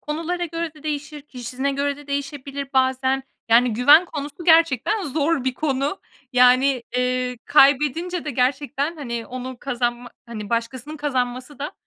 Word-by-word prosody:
konulara 335 +4 -3
göre 330 -1 -4
de 300 - -16
değişir, 300 0 -4
kişisine 260 0 -4
göre 280 +1 -1
de 290 - -14
değişebilir 280 -1 -4
bazen. 260 0 +1 0.3
Yani, 235 +1 +5
güven 290 +9 +6
konusu 295 0 -7
gerçekten 330 - +4
zor 295 -2 0
bir 260 -1 0
konu. 280 +3 -1 0.3
Yani, 250 +1 +4
eee, 250 0 -1
kaybedince 300 +5 +3
de 300 - -3
gerçekten, 280 +4 -1
hani, 235 -5 -5
onu 255 0 -6
kazanma, 240 -2 -2 0.2
hani, 215 -3 -7
başkasının 240 +6 -3
kazanması 255 -1 -3
da 290 +6 -4
275 Hz, 140 wpm, -22 LUFS, 250-300 Hz, 0.3 s, güven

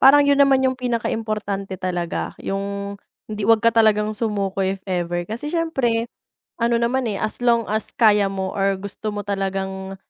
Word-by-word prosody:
Parang 285 +2 +7
'yun 285 0 +3
naman 270 -1 +5
yung 260 0 +2
pinaka-importante 215 -5 -2
talaga, 175 -2 -3
'yung 200 0 -3 0.3
hindi 215 -1 -4
'wag 225 -1 +5
ka 230 - +5
talagang 215 -2 +3
sumuko 200 -3 -1
if 190 0 -2
ever. 175 -1 -1
Kasi 235 +8 -4
siyempre 265 -9 0 0.5
ano 235 0 +2
naman, 240 +3 +1
eh, 200 - -3
as 215 - -3
long 235 -2 +3
as 215 +1 -1
kaya 210 -5 +4
mo 190 -1 -3
or 195 0 +1
gusto 200 +2 -5
mo 205 -1 -5
talagang 195 -1 -3
210 Hz, 165 wpm, -22 LUFS, 195-235 Hz, 0.5 s, Parang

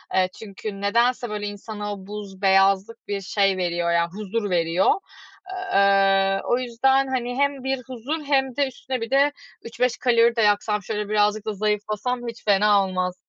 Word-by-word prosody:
eee, 185 -1 +3
çünkü 200 -1 -7
nedense, 235 +4 +1
böyle, 210 -1 -4
insana 205 0 -6
o 195 -1 -10
buz, 205 -2 -8
beyazlık 195 +3 +2
bir 200 -1 -3
şey 195 0 +1
veriyor 175 -1 -1
ya, 170 0 +2
huzur 210 +1 -3
veriyor. 170 +1 +2 0.8
Eee, 195 0 +3
o 245 - +1
yüzden, 265 +2 +2
hani, 245 -2 -2
hem 280 -2 0
bir 265 0 -1
huzur 265 +6 -5
hem 270 -3 +1
de 285 0 +1
üstüne 260 -1 -5
bir 230 - -4
de 280 +2 +4 0.3
3-5 240 +1 -1
kalori 235 -1 +3
de 230 - +1
yaksam, 210 0 +1
şöyle 210 0 -4
birazcık 210 0 +1
da 215 - -2
zayıflasam 210 +4 -2
hiç 230 0 -8
fena 205 0 +4
olmaz. 185 -1 -2
210 Hz, 165 wpm, -23 LUFS, 195-245 Hz, 0.8 s, de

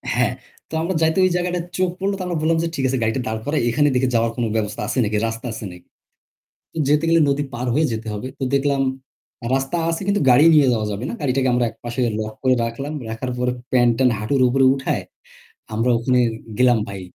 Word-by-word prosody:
হ্যাঁ। - - +2 0.4
তো - - -15
আমরা 170 +3 -1
যাইতে 160 +3 +2
ওই - - +3
জায়গাটা 180 0 -1 0.2
চোখ 185 -1 +2
পড়লো। 195 +1 0
তো - - -4
আমরা 175 -2 -2
বললাম 165 +1 +2
যে - - 0
ঠিক 135 - -2
আছে 130 +1 0
গাড়িটা 110 +3 0
দাঁড় 110 0 -2
করাই, 150 +1 0
এখানে 145 +5 +2
দেখে 125 0 +2
যাওয়ার 115 0 +2
কোন 120 - -2
ব্যবস্থা 105 -2 -2
আছে - - -3
নাকি, 105 0 0
রাস্তা 115 +2 -6
আছে 110 - -6
নাকি? 90 0 -14 0.9
তো - - -10
যেতে 150 +2 +3
গেলে 165 0 +4
নদী 140 +1 0
পার 120 +2 -3
হয়ে 155 +5 +3
যেতে 110 0 -5
হবে। 105 +5 -5
তো 135 - -2
দেখলাম 140 0 +1 0.7
রাস্তা 135 +6 0
আছে 165 +3 -2
কিন্তু 200 0 +1
গাড়ি 125 +5 +6
নিয়ে 145 -3 +5
যাওয়া 110 -2 -1
যাবে 105 +4 -4
না। - - -4
গাড়িটাকে 130 -2 +1
আমরা 125 0 +2
একপাশে 120 +2 -5 0.2
লক 110 0 -4
করে 130 -1 +4
রাখলাম। 135 +6 -5 0.2
রাখার 115 +3 -4
পরে 125 0 0 0.2
প্যান্ট-ট্যান্ট 125 0 +3
হাঁটুর 130 +5 0
উপরে 135 +1 +3
উঠায় 135 -1 -2 0.7
আমরা 115 +3 +1
ওখানে 125 +2 +2 0.4
গেলাম 125 -2 +4
ভাই। 100 -1 -6
130 Hz, 215 wpm, -21 LUFS, 115-150 Hz, 0.9 s, গাড়ি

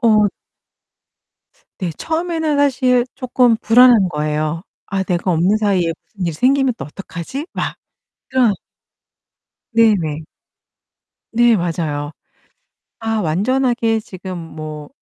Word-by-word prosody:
어 215 -4 +4 1.5
네 180 -3 -1
처음에는 320 -2 -1
사실 255 -3 +3
쪼끔 245 -2 +2
불안한 230 -4 +6
거예요. 155 +1 -2 0.2
'아 195 0 -2
내가 180 0 -1
없는 180 +5 +3
사이에 190 -6 +1
무슨 195 -4 -6
일이 165 - -1
생기면 260 - +2
또 - - -6
어떡하지?' 195 - -7
막 - - -3 0.5
그런 250 -5 +3 1.2
네네. 185 -10 +2 1.1
네, 235 -1 +4
맞아요. 155 -4 -2 0.9
아 225 -1 -1
완전하게 225 +6 +1
지금 185 -3 -8
뭐 155 -2 -8
210 Hz, 210 characters per minute, -18 LUFS, 165-245 Hz, 1.5 s, 불안한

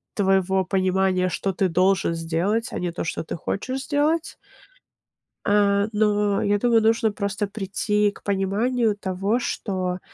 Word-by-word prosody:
твоего 190 -1 +2
понимания, 185 0 +1
что 195 +2 -2
ты 185 +1 +1
должен 185 0 +2
сделать, 170 +7 -1
а - - -4
не 175 -1 -2
то, 170 - -4
что 165 - -3
ты - - -5
хочешь 255 +10 -3
сделать. 310 +3 0 1.1
А, 200 0 +3
но 210 -1 +2
я 205 0 +2
думаю, 235 0 +3
нужно 225 0 +2
просто 200 0 -2
прийти 210 +1 0
к - - -17
пониманию 210 +4 0
того, 195 +4 -1
что, 185 -6 -3
200 Hz, 140 wpm, -23 LUFS, 190-215 Hz, 1.1 s, А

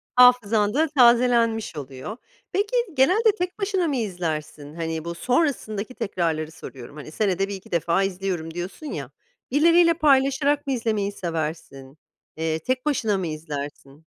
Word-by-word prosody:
Hafızan 225 -4 +5
da 315 +3 +2
tazelenmiş 235 - +3
oluyor. 140 - -7 0.3
Peki 410 +5 -1 0.2
genelde 385 - +4
tek 360 +3 -3
başına 385 -4 0
mı 285 - -1
izlersin? 155 - -4
Hani, 165 -1 -4
bu 170 0 -4
sonrasındaki 245 - -1
tekrarları 165 -7 -2
soruyorum, 135 -2 -11
hani, 150 0 -9
senede 195 +1 0
1-2 195 -2 -8
defa 170 +3 +1
izliyorum 180 -4 -3
diyorsun 180 - -6
ya, - - -5 0.4
birileriyle 335 +3 +5
paylaşarak 280 -1 +2
mı 270 - +1
izlemeyi 215 -4 -1
seversin? 155 -6 -5 0.4
Eee, 160 0 -1
tek 255 - -2
başına 225 -9 +1
mı 185 - -2
izlersin? 150 -1 -7
205 Hz, 135 wpm, -24 LUFS, 160-265 Hz, 0.4 s, Hafızan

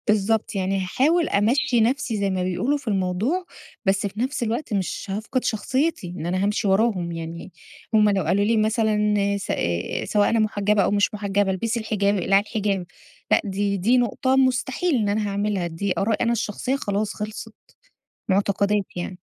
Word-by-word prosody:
بالضبط 215 +1 +1
يعني 195 0 0
هاحاول 305 - +2
أمَشّي 235 +3 +2
نَفسي 240 -1 0
زي 200 -1 0
ما 185 -1 -1
بيقولوا 185 +11 0
في 270 -3 -14
الموضوع، 205 - 0 0.4
بس 195 +1 +2
في 200 +2 -9
نَفس 260 +1 -1
الوقت 230 +2 -2
مش 190 -4 -2
هافقد 220 +6 -2
شخصيتي 260 - -1
إن 160 - -5
أنا 185 +2 0
هامشي 205 0 0
وراهم 190 -3 +1
يعني، 165 +2 -7 0.4
هُم 210 -1 +5
لو 195 -2 +1
قالوا 200 +2 +2
لي 225 +1 +2
مثلًا 220 0 +2 0.4
س 195 - -6
آآ، 85 0 -2
سواء 205 -1 +2
أنا 230 - +2
محجبة 210 -1 +2
أو - - +1
مش 205 +1 +2
محجبة 200 -1 0
البسي 225 +5 -1
الحجاب، 205 -2 0
اقلعي 195 +2 +3
الحجاب، 200 -3 -2 0.5
لأ - - +5
دي 200 0 -1
دي 225 +7 +3
نقطة 255 +2 +1
مستحيل 265 +5 +1
إن 215 -4 +1
أنا 210 +1 0
هاعملها، 200 -2 -1
دي 180 +3 -2
آرائي 215 +3 +1
أنا 235 - +2
الشخصية 235 +3 -1
خلاص 205 -5 -2
خلصت، 215 +1 -6 0.8
معتقدات 200 +1 +1
يعني. 175 +1 -5
205 Hz, 170 wpm, -23 LUFS, 195-230 Hz, 0.8 s, هُم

